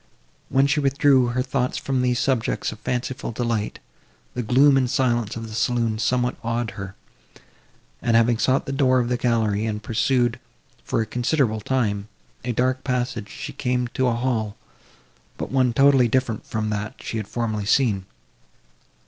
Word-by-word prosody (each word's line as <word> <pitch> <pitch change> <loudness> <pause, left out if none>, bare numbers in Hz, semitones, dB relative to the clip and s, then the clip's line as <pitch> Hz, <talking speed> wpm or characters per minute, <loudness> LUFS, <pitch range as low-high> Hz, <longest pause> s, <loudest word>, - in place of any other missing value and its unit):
When 135 +1 +4
she 140 +2 +2
withdrew 140 -2 +3
her 125 +1 0
thoughts 125 -1 -1
from 135 -2 -1
these 125 -1 +1
subjects 125 -2 0
of 110 - -10
fanciful 125 +1 -3
delight, 115 -2 -2 0.6
the 125 - -2
gloom 135 +5 +5
and 130 -2 +2
silence 120 -4 0
of 115 0 -6
the 110 - -9
saloon 115 -1 0
somewhat 125 +1 0
awed 115 0 -1
her; 95 -3 -8 1.1
and, 115 -1 +2
having 115 0 +3
sought 130 +2 +2
the - - -4
door 130 -2 +3
of 120 -1 +1
the 125 - +1
gallery, 115 -3 +1
and 105 -1 -3
pursued, 120 +1 +1 0.4
for - - 0
a - - -1
considerable 120 -1 0
time, 105 -4 -1 0.4
a 125 - -1
dark 130 +2 0
passage, 125 -4 -2
she - - -7
came 125 -1 -1
to 130 +2 0
a 120 - +1
hall, 115 -4 -1 0.8
but - - -5
one 130 -2 +3
totally 135 0 +5
different 115 -2 -1
from 110 -1 -2
that 105 +1 -3
she 115 - -4
had 105 -2 -4
formerly 110 -3 -2
seen. 105 -7 +2
120 Hz, 165 wpm, -23 LUFS, 110-130 Hz, 1.1 s, gloom